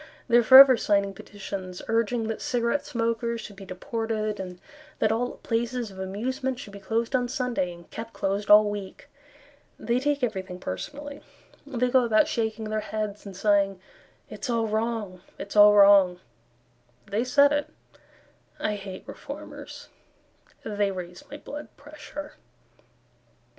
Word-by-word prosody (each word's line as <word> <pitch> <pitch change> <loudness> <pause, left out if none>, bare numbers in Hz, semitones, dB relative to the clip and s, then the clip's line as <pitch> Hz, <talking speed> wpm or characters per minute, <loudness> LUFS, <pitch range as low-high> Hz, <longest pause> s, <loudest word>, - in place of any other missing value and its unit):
They 240 -1 +5
are - - +6
forever 260 +1 +10
signing 200 -2 +1
petitions 190 -3 -7
Urging 230 +1 0
that 225 -1 -4
cigarette 240 +3 0
smokers 230 0 -1
should 205 - -9
be 195 0 -11
deported, 215 +2 -3
And 180 -2 -7 0.4
that 215 - +2
all 240 +2 -1
places 235 -1 -2
of 190 - -12
amusement 255 +7 -3
should 205 - -10
be 200 - -9
closed 225 +5 -1
on 250 -1 +1
Sunday 245 -8 -2
And 170 -1 -13
kept 225 +1 -7
closed 200 0 -2
all 210 0 +8
week. 205 -2 -6 0.7
They 240 +1 0
take 285 0 -1
everything 190 -5 -3
personally; 290 +7 -6 0.5
They 250 -3 0
go 260 -1 +5
about 220 -2 +3
shaking 220 -1 -2
their 215 - 0
heads, 210 -1 -4
And 190 -2 -9
sighing, 200 -2 +2 0.5
"It's 275 - -7
all 230 -1 +1
wrong, 215 -4 -2 0.2
it's 200 - -8
all 210 0 +8
wrong," 200 -3 +6 0.9
They 205 +4 -1
said 280 +3 +4
it. 290 0 0 0.9
I 210 -1 -1
hate 195 -2 -8
Reformers; - - -9 0.8
They 205 -2 0
raise 180 -2 -7
my 290 - -7
blood 295 0 -8
pressure. 295 0 -9
220 Hz, 145 wpm, -26 LUFS, 200-245 Hz, 0.9 s, forever